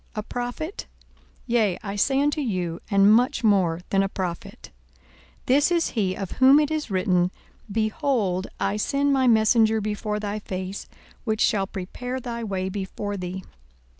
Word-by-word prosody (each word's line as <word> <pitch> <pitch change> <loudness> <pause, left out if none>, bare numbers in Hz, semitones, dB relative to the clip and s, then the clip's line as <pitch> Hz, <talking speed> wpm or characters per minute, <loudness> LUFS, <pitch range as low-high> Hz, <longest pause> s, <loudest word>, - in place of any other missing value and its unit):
A 210 - -3
prophet? 245 - -5 0.6
Yea, 225 -7 +1
I 200 -1 -4
say 270 +6 +2
unto 295 +1 +1
you, 180 - -2
and 200 0 +5
much 250 +2 +2
more 185 -6 +3
than 195 - +3
a 195 - 0
prophet. 180 -3 -6 0.7
42:007:027 - - -33
This 285 +6 +3
is 340 -1 +2
he, 195 -5 -1
of 195 -3 -5
whom 265 +3 +6
it 300 0 +1
is 310 -5 -2
written, 185 -2 +2 0.4
Behold, 215 - 0
I 200 +1 0
send 280 +6 +1
my 260 -1 +3
messenger 220 -1 +4
before 210 0 -3
thy 210 0 -3
face, 190 -1 -6 0.4
which 220 -2 -1
shall 195 -4 +2
prepare 245 +8 -5
thy 235 -2 -5
way 190 -3 -2
before 200 +1 -4
thee. 185 0 -5
210 Hz, 160 wpm, -24 LUFS, 190-250 Hz, 0.7 s, whom